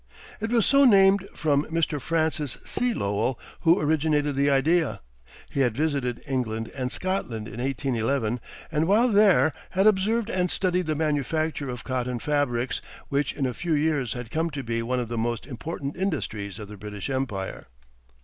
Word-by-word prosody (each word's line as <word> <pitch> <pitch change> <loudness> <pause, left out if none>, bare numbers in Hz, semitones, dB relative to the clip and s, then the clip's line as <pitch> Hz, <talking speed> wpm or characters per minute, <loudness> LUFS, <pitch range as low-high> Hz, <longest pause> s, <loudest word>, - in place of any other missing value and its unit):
It 220 +1 -2
was 235 -3 +3
so 280 0 +5
named 195 -4 +5
from 145 -1 +1
Mr. 160 -3 -1
Francis 160 -4 -1
C. 245 0 +1
Lowell, 105 - -1 0.2
who 165 +2 +4
originated 150 -1 +1
the 140 +1 +3
idea. 155 +4 +2 0.5
He - - -2
had 125 -4 +2
visited 140 -6 -1
England 115 -5 -2
and 130 -2 -3
Scotland 125 - -2
in 115 - -8
1811, 125 -2 0 0.3
and 160 +1 +1
while 225 +6 +4
there 195 - +5 0.2
had 190 +2 +1
observed 215 +3 +3
and 180 -1 +1
studied 180 -2 0
the 155 - 0
manufacture 150 -1 -1
of 125 -1 -6
cotton 125 -1 -2
fabrics, 135 -3 0 0.3
which 140 +1 0
in 140 - -1
a 125 - -1
few 170 +4 -2
years 145 -4 +1
had 120 -2 -7
come 165 +2 0
to 145 -3 -5
be 115 -1 -1
one 125 +2 -1
of 120 - -2
the 115 0 -3
most 120 0 -1
important 140 +1 -5
industries 120 - -3
of 105 -2 -7
the 105 0 -10
British 105 0 -6
Empire. 125 - -3
145 Hz, 170 wpm, -26 LUFS, 125-165 Hz, 0.5 s, so